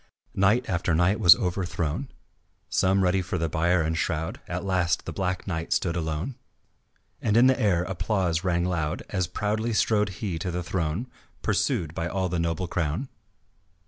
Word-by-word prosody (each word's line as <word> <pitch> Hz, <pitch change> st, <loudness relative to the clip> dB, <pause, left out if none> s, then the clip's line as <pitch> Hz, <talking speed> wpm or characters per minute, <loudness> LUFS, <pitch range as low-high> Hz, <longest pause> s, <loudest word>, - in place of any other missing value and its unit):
Knight 105 Hz, +6 st, +3 dB
after 85 Hz, -2 st, 0 dB
knight 90 Hz, +6 st, +2 dB
was 90 Hz, -5 st, +9 dB
overthrown, 90 Hz, -, -2 dB, 0.6 s
Some 95 Hz, +1 st, +2 dB
ready 95 Hz, +1 st, +2 dB
for 90 Hz, 0 st, -3 dB
the 80 Hz, -1 st, 0 dB
bier 85 Hz, +2 st, +2 dB
and 80 Hz, +1 st, -1 dB
shroud, 80 Hz, -1 st, -2 dB
At 90 Hz, +2 st, -4 dB
last 90 Hz, -2 st, +1 dB
the -, -, -5 dB
black 95 Hz, -1 st, -2 dB
knight 80 Hz, -3 st, -4 dB
stood 85 Hz, -2 st, 0 dB
alone 80 Hz, -, -3 dB, 0.8 s
And 110 Hz, 0 st, +2 dB
in 120 Hz, -, +7 dB
the 130 Hz, +1 st, +4 dB
air 90 Hz, -5 st, +3 dB
applause 90 Hz, -2 st, -1 dB
rang 85 Hz, -2 st, +1 dB
loud 85 Hz, -4 st, -1 dB
As 95 Hz, -2 st, -1 dB
proudly 110 Hz, +5 st, -1 dB
strode 105 Hz, -1 st, +2 dB
he 90 Hz, -2 st, -4 dB
to 90 Hz, +2 st, -3 dB
the 90 Hz, 0 st, -3 dB
throne 85 Hz, +4 st, -2 dB, 0.4 s
Pursued 80 Hz, -2 st, 0 dB
by 85 Hz, -1 st, -2 dB
all 95 Hz, +1 st, -1 dB
the 85 Hz, 0 st, -1 dB
noble 85 Hz, +2 st, -1 dB
crowd. 85 Hz, -, -2 dB
90 Hz, 170 wpm, -26 LUFS, 85-100 Hz, 0.8 s, was